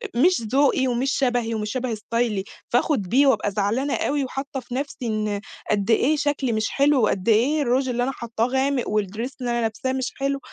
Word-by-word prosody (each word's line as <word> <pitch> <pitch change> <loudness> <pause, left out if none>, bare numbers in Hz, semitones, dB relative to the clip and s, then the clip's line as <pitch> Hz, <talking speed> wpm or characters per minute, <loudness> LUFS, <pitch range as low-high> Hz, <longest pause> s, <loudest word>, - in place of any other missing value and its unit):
مش 340 +2 +4
ذوقي 265 +3 +2
ومش 250 +3 0
شبهي 245 -4 0
ومش 210 -1 -3
شبه 255 -2 -2
استايلي، 220 -1 -1 0.3
فآخد 245 0 +2
بيه 260 +10 +3
وأبقى 210 -6 +2
زعلانة 220 +8 0
أوي 285 0 0
وحاطّه 270 +2 -5
في 250 -1 -8
نَفسي 280 +2 -3
إن 215 -2 -1 0.3
قدّ 205 +1 +1
إيه 280 +7 +3
شكلي 290 -4 0
مش 220 0 0
حلو، 280 -2 +3
وقدّ 195 0 +1
إيه 265 +8 +3
الrouge 260 +1 +1
اللي 245 0 0
أنا 265 - 0
حاطّاه 230 -3 -2
غامق، 265 0 +1
والdress 215 +4 -2
اللي 245 -1 -1
أنا 235 - 0
لابساه 230 +4 -2
مش 260 -1 -2
حلو، 275 0 -1
245 Hz, 195 wpm, -23 LUFS, 220-275 Hz, 0.3 s, مش